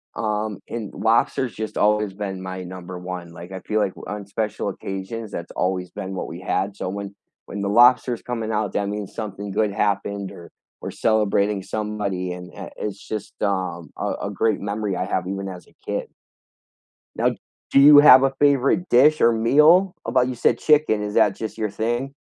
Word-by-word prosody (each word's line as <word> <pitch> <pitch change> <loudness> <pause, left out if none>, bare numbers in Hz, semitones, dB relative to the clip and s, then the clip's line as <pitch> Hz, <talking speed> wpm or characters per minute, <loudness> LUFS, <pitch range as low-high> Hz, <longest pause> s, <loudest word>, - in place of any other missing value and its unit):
um, 105 -1 -2
and 110 -4 -5
lobster's 115 +2 +1
just 110 -1 -5
always 105 -1 +2
been 95 -2 -5
my 95 0 -6
number 90 0 -8
1, 90 -1 -7
like, 85 +2 -11
I 95 - -6
feel 110 - -1
like 100 -3 0
o - - -10
on 105 -1 -5
special 105 +1 -3
occasions 100 +3 -6
that's 85 -3 -6
always 90 -1 -2
been 95 +1 -6
what - - -4
we 85 - -8
had, 95 +2 -1
so 95 - -4
when 100 0 -6 0.3
when 100 - -6
the 100 - -1
lobster's 120 +2 +5
coming 115 -3 -4
out, 105 -2 -1
that 100 - -1
means 105 -1 -5
something 100 -2 -5
good 105 +1 +1
happened 100 -1 -1
or 85 - -12 0.3
we're - - -5
celebrating 105 -2 +1
somebody, 105 -4 -3
and, 90 0 -10
uh, - - -8
it's 100 -1 -5
just, 105 -2 -5
um, 95 -5 -2
a - - -3 0.2
a - - -6
great 110 -2 0
memory 100 -1 -2
I - - -2
have 90 -1 -2
even 95 +1 -4
as 90 -2 -10
a - - -24
kid. - - -3 1.1
Now, - - +2 0.4
do 140 - +5
you 145 +1 +9
have 135 -3 +9
a 135 0 +2
favorite 145 +5 +3
dish 150 +6 +5
or 115 - +5
meal? 150 +11 +4
About 125 +2 +2
you 130 - -3
said 120 0 +2
chicken, 150 -9 +3
is 105 0 -4
that - - +3
just 110 -2 -6
your 110 -2 -1
thing? 120 +6 -2
105 Hz, 195 wpm, -22 LUFS, 95-115 Hz, 1.1 s, you